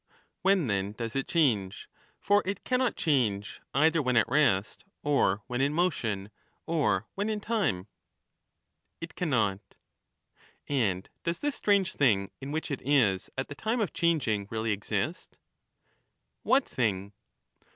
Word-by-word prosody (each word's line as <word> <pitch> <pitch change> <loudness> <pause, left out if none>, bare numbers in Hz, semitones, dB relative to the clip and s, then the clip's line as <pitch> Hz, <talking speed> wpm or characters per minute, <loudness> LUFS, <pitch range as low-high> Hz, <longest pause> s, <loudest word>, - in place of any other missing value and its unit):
When 190 -4 +3
then 100 -2 -1
does 115 +2 -5
it 135 - -1
change; 110 - +1 0.3
for 205 0 +3
it 200 +1 -4
cannot 255 -1 +1
change 110 - 0
either 160 +3 +4
when 125 -3 +1
at 115 - +4
rest, 115 -8 +1 0.2
or 110 -9 +2
when 125 +1 -2
in 140 +2 +1
motion, 115 - -1 0.3
or 155 - +1
when 205 +2 -2
in 215 -1 -1
time? 205 - -1 1.1
It 165 - -7
cannot. 110 - 0 1.1
And 105 -10 0 0.2
does 170 0 -1
this 290 -1 0
strange 200 -3 +2
thing 100 -8 +2
in 135 +1 -6
which 160 0 -3
it 140 - -3
is 120 -10 +2
at 135 - -2
the - - -7
time 220 +11 -1
of 210 - -1
changing 120 -12 +1
really 110 0 -1
exist? 105 - -3 1.0
What 265 +1 +3
thing 100 -4 -1
135 Hz, 140 wpm, -29 LUFS, 105-170 Hz, 1.1 s, either